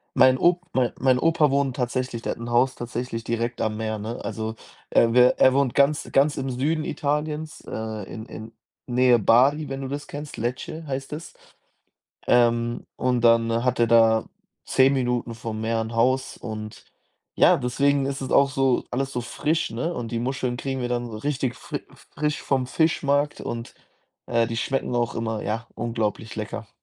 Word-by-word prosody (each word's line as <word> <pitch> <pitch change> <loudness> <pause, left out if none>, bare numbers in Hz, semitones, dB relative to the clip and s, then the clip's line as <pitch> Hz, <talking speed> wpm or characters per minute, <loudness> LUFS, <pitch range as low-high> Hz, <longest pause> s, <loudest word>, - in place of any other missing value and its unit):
Mein 130 0 +6
Op 175 +1 +3
mein 125 -2 +2
mein 130 -1 +3
Opa 160 -2 +3
wohnt 140 -2 +1
tatsächlich 125 -2 -2
der - - -2
hat - - -15
'n 120 0 -6
Haus 125 +2 +3
tatsächlich 120 -1 -4
direkt 115 +1 -2
am 110 -1 -1
Meer, 110 -1 -3
ne? 110 +3 -5
Also, 110 0 -4 0.3
er 115 0 +4
wä 125 0 +6
er 130 - +6
wohnt 135 -3 +1
ganz 145 +1 +2
ganz 145 +2 +3
im 135 -1 -2
Süden 150 +5 -1
Italiens, 150 +1 -2
äh, 110 -2 -5
in 110 - -7
in 110 0 -9 0.4
Nähe 125 -1 +4
Bari, 135 +8 +4
wenn 135 0 -4
du 135 - -4
das 145 +2 -5
kennst, 145 0 -7
Lecce 130 +7 -4
heißt 135 +1 -4
es. 160 +3 -7 0.9
Ähm, 120 -1 +2
und 125 -2 0
dann 115 0 +3
hat 125 -1 +1
er 115 - +5
da 115 -1 +4 0.4
10 135 +1 +4
Minuten 125 -3 -1
vom 110 -1 -5
Meer 115 0 0
'n 110 +1 -4
Haus 130 +3 +1
und, 110 -2 -7 0.5
ja, - - +5
deswegen 140 +2 +1
ist 135 -1 -3
es 130 - -5
auch 140 0 +4
so 135 -2 +1
alles 135 +2 -2
so 125 - -2
frisch, 155 +6 -1
ne? 125 +10 -2
Und 120 -1 -5
die 115 - 0
Muscheln 125 -1 -2
kriegen 135 +1 -3
wir 120 - -2
dann 120 -1 -2
so 110 - -6
richtig 135 -2 -2
fri - - -6 0.3
frisch 150 0 -1
vom 130 -2 0
Fischmarkt 145 -1 +1
und, 115 0 -5 0.5
äh, 115 -1 +2
die 115 - -4
schmecken 125 +1 -1
auch 120 -1 0
immer, 110 -2 -2
ja, 115 +3 -3
unglaublich 115 -2 -3
lecker. 105 -1 -5
125 Hz, 185 wpm, -24 LUFS, 115-135 Hz, 0.9 s, Mein